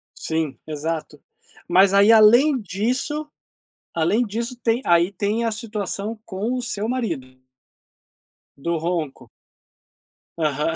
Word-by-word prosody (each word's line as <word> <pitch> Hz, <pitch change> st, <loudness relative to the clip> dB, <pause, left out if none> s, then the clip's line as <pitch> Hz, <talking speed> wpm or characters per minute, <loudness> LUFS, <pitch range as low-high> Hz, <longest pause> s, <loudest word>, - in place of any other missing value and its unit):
Sim, 160 Hz, -4 st, -2 dB
exato. 155 Hz, -1 st, -4 dB, 0.5 s
Mas 190 Hz, +2 st, +5 dB
aí, 200 Hz, +3 st, +6 dB
além 240 Hz, +6 st, +6 dB
disso 250 Hz, -, -2 dB, 0.7 s
além 170 Hz, +9 st, +1 dB
disso, 235 Hz, +4 st, -4 dB
tem 235 Hz, 0 st, 0 dB
aí 170 Hz, +2 st, +3 dB
tem 205 Hz, +4 st, -1 dB
a 230 Hz, -, 0 dB
situação 215 Hz, 0 st, -3 dB
com 215 Hz, +5 st, -3 dB
o 250 Hz, -, -2 dB
seu 220 Hz, -3 st, -2 dB
marido 220 Hz, -, -2 dB, 1.3 s
do 170 Hz, +4 st, -2 dB
ronco. 165 Hz, -4 st, -3 dB, 1.1 s
Aham. 150 Hz, 0 st, 0 dB
200 Hz, 110 wpm, -22 LUFS, 165-230 Hz, 1.3 s, aí